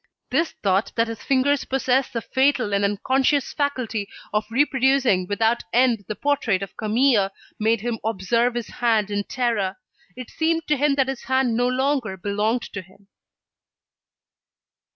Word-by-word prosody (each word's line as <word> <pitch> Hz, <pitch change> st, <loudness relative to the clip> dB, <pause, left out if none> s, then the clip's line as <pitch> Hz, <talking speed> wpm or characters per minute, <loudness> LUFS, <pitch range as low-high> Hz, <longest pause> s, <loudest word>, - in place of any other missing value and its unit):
This 325 Hz, 0 st, +1 dB
thought 195 Hz, +1 st, +1 dB
that 230 Hz, 0 st, +2 dB
his 230 Hz, -1 st, -6 dB
fingers 275 Hz, +1 st, +1 dB
possessed 265 Hz, 0 st, 0 dB
the 230 Hz, -2 st, -3 dB
fatal 260 Hz, -5 st, +1 dB
and 200 Hz, 0 st, +1 dB
unconscious 260 Hz, +7 st, +1 dB
faculty 250 Hz, -8 st, -2 dB, 0.2 s
of 210 Hz, 0 st, 0 dB
reproducing 265 Hz, -6 st, +2 dB
without 225 Hz, +4 st, +1 dB
end 235 Hz, -4 st, +2 dB
the 215 Hz, -, -4 dB
portrait 245 Hz, -9 st, 0 dB
of 195 Hz, -, -9 dB
Camille, 220 Hz, -2 st, +2 dB, 0.3 s
made 220 Hz, 0 st, +1 dB
him 235 Hz, -1 st, -3 dB
observe 230 Hz, +3 st, 0 dB
his 240 Hz, -2 st, -3 dB
hand 220 Hz, -4 st, 0 dB
in 205 Hz, 0 st, -1 dB
terror. 220 Hz, -6 st, -1 dB, 0.4 s
It 250 Hz, -1 st, -9 dB
seemed 325 Hz, 0 st, 0 dB
to 300 Hz, -, +4 dB
him 285 Hz, +1 st, +2 dB
that 270 Hz, -2 st, +2 dB
his 270 Hz, -1 st, -5 dB
hand 260 Hz, -3 st, +1 dB
no 245 Hz, +1 st, +2 dB
longer 255 Hz, -5 st, 0 dB
belonged 210 Hz, +5 st, -1 dB
to 200 Hz, -, -4 dB
him. 195 Hz, +2 st, -22 dB
235 Hz, 150 wpm, -23 LUFS, 210-265 Hz, 0.4 s, to